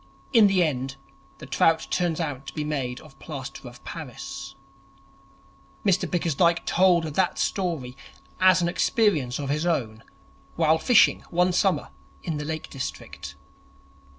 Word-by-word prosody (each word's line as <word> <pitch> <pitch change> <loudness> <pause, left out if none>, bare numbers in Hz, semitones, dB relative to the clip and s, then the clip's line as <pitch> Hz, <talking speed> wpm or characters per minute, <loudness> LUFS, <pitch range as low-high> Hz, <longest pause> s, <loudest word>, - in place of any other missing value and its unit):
In 225 -4 +7
the 190 -2 +3
end 135 -3 -2 0.4
the - - -10
trout 160 +4 +2
turns 175 -2 0
out 140 -5 -4
to 135 - -7
be 150 - -2
made 135 -5 -3
of 135 -3 -17
plaster 135 -3 -7
of 120 - -16
Paris. 135 -3 -8 1.3
Mr 190 -2 +2
Bickersdyke 170 0 +1
told 180 -2 +4
that 165 +4 0
story 160 -10 -2 0.4
as 185 -1 +5
an - - +2
experience 175 - +1
of 140 -2 -4
his 150 +2 0
own 110 -10 -1 0.5
while 160 -1 +3
fishing 240 +2 +4
one 180 +1 +2
summer 190 0 +1 0.3
in 160 - -3
the 150 - -4
Lake 155 0 -4
District. 135 - -7
160 Hz, 140 wpm, -25 LUFS, 135-180 Hz, 1.3 s, In